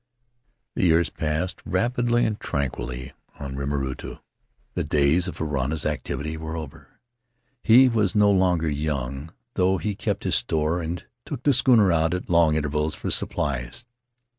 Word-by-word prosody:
"The - - -1
years 85 -2 +3
passed 80 +4 -2
rapidly 120 0 +1
and 110 -1 -2
tranquilly 65 -2 -4 0.3
on 70 -2 -6
Rima 70 +1 -2
rutu. 65 -1 -5 0.6
The - - -1
days 75 +4 +2
of 90 - -6
Varana's 75 -1 -2
activity 75 +1 -3
were 80 +1 -5
over; 75 -4 -10 0.6
he 125 +4 +7
was 110 -6 +1
no 105 -1 +5
longer 90 -4 +2
young, 70 -1 -3 0.2
though 95 0 +2
he 105 +1 -2
kept - - -3
his - - 0
store 75 +7 +1
and 85 +1 -5 0.2
took 120 - -7
the 145 - +4
schooner 115 -7 +5
out 80 +1 +2
at 90 - -5
long 85 -2 +4
intervals 75 0 -1
for - - -4
supplies. 70 - -2
80 Hz, 150 wpm, -24 LUFS, 70-95 Hz, 0.6 s, he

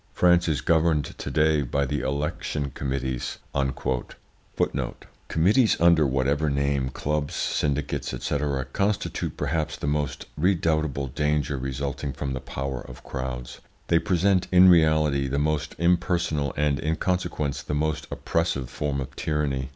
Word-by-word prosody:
France 90 -1 +4
is 75 -3 0
governed 80 -3 +2
to - - -5
day 80 -1 +3
by 70 +1 0
the 75 +2 -1
election 70 +1 -2
committees." 65 -2 -3 1.9
Committees 105 +9 +3
under 85 -3 +5
whatever 70 +3 +1
name, 70 -1 0
clubs, 75 +2 -2
syndicates, 70 0 -1
&c., 65 +3 -2 0.4
constitute 105 +1 -1
perhaps 75 +2 -1
the - - -5
most 75 -1 -1
redoubtable 80 -5 +1
danger 75 +1 0
resulting 70 +1 -3
from 70 -2 -3
the 65 - -3
power 65 0 -4
of 65 +1 -11
crowds. 65 -2 -5 0.3
They 85 - +5
represent 95 +2 +2
in 90 0 +8
reality 80 -5 +4
the 70 +2 -1
most 75 0 0
impersonal 85 -4 +1
and, 75 -1 +1
in 80 +2 0
consequence, 85 -6 -1
the 75 - -3
most 80 +1 -1
oppressive 75 -6 -1
form 70 0 -2
of 65 0 -7
tyranny. 70 -4 -1
75 Hz, 135 wpm, -25 LUFS, 70-80 Hz, 1.9 s, in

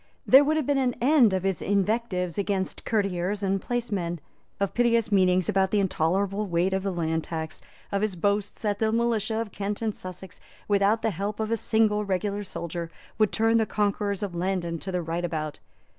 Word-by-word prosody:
There 270 +2 +8
would 310 +2 +1
have 310 - 0
been 285 0 +2
an 250 -2 +1
end 255 -3 +5
of 190 -1 -1
his 195 -4 -1
invectives 200 -3 0
against 195 -2 -2
courtiers 200 -1 0
and 195 0 0
placemen, 205 -8 -2 0.4
of 200 -1 -1
piteous 235 -2 +2
meanings 185 -2 +3
about 190 0 +2
the 210 - +2
intolerable 195 +3 0
weight 175 +2 +1
of 190 - 0
the 195 0 -2
land 160 -2 -1
tax, 160 -1 -5 0.3
of 200 -1 0
his 210 -3 -1
boasts 200 +4 -1
that 205 -1 0
the 220 -1 +2
militia 225 -1 0
of 225 -3 -4
Kent 205 0 -3
and 220 -2 0
Sussex, 185 0 -9 0.3
without 205 +2 +2
the 225 - +2
help 200 +4 -4
of 220 0 -2
a - - +3
single 215 -1 +2
regular 200 +1 -1
soldier, 170 -3 -5 0.3
would 215 -2 +3
turn 225 +1 +3
the 220 -1 +2
conquerors 205 -1 -1
of 195 -3 -3
Landen 175 -1 -2
to 190 - -5
the 180 -1 -1
right 165 +2 -3
about. 155 -3 -3
200 Hz, 195 wpm, -26 LUFS, 180-220 Hz, 0.4 s, There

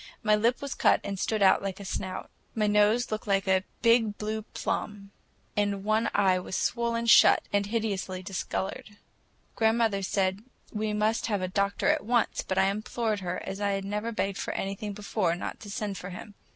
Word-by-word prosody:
My 215 -1 +4
lip 235 +5 +1
was 280 - -3
cut - - +3
and 200 -1 -4
stood 215 0 0
out 190 - +5
like 195 -1 -4
a 200 - -8
snout. 185 0 -5 0.2
My 215 -2 +1
nose 210 +3 +3
looked 215 0 -3
like 195 -1 +1
a 190 0 +3 0.2
big 230 -3 +4
blue 215 +1 -3
plum, 205 -2 -4 0.4
and 205 -1 0
one 215 +2 +1
eye 190 -2 +3
was 180 - -5
swollen 235 -1 0
shut 230 - +7
and 200 0 +2
hideously 200 -4 -2
discolored. 195 +2 -4 0.6
Grandmother 225 -3 +2
said 190 0 0 0.3
we 215 0 -1
must 215 +2 0
have 205 -4 0
the 185 - -1
doctor 200 +5 0
at 305 +1 +2
once, 240 +1 +1
but 190 - -3
I 190 - +5
implored 215 +1 -2
her, 180 -1 -4
as 195 +1 -5
I 200 -1 +1
had 195 0 -3
never 210 +3 -2
begged 195 -3 -2
for - - -3
anything 195 +2 -3
before, 200 -4 -1
not 175 - -6
to 205 - -10
send 200 -1 -3
for 180 - -7
him. 200 +3 -9
205 Hz, 190 wpm, -28 LUFS, 195-220 Hz, 0.6 s, shut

